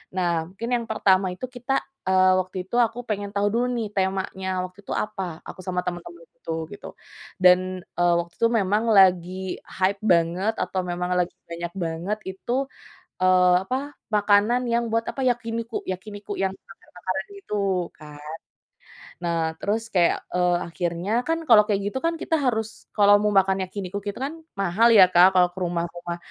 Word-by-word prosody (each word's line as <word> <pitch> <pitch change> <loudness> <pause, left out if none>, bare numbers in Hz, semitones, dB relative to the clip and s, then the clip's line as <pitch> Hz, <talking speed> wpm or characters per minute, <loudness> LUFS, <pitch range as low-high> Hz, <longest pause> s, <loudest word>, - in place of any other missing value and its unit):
nah 170 -3 0
mungkin 210 +6 -6
yang 235 -1 -2
pertama 195 -3 +3
itu 255 - -5
kita, 250 +2 -1 0.3
eee, 185 0 +5
waktu 185 0 -4
itu 235 - -5
aku 230 0 +1
pengen 205 -1 -2
tahu 200 0 +2
dulu 240 +2 +1
nih 225 -2 -2
temanya 190 0 -1 0.2
waktu 185 +2 -13
itu - - -4
apa 185 -6 -4
aku - - -9
sama 180 -1 -1
temen-temen 175 -1 -6
itu 165 - -5 0.2
gitu 205 - -10 0.6
dan, 185 0 +4 0.2
eee, 175 0 +4
waktu 170 0 -6
itu 230 - +4
memang 205 +2 +1
lagi 185 0 +3
hype 190 +1 -1
banget 180 +3 +2
atau 185 +1 -3
memang 180 0 -3
lagi 175 - -1
banyak 170 0 -5
banget 175 +3 -3
itu, 190 +5 -5 0.7
eee, 185 -1 +5
apa 265 +6 -3 0.2
makanan 210 +3 +3
yang 235 0 +2
buat 230 0 +1
apa 270 - -6
yakiniku 230 -2 -2
yakiniku 205 +2 -6
yang 195 - +2
bakar-bakaran 190 0 -7
gitu 195 - -1
kan, 150 -1 -12 1.1
nah 170 -1 0 0.2
terus 215 +3 0
kayak, 175 -2 +3 0.2
eee, 180 -1 +2
akhirnya 175 +3 -3 0.2
kan 325 0 +1
kalau 220 -3 +8
kayak 200 -2 +1
gitu - - -2
kan 335 0 +2
kita 325 - +1
harus 220 -4 0 0.3
kalau 205 -1 +7
mau 210 0 +1
makan 195 0 +3
yakiniku 190 0 -5
gitu 205 - -4
kan 280 +4 -3 0.2
mahal 195 +4 +3
ya 195 -4 +9
Kak 180 +2 +7
kalau 180 -1 +5
ke - - -9
rumah-rumah 175 0 -3
190 Hz, 165 wpm, -24 LUFS, 180-215 Hz, 1.1 s, ya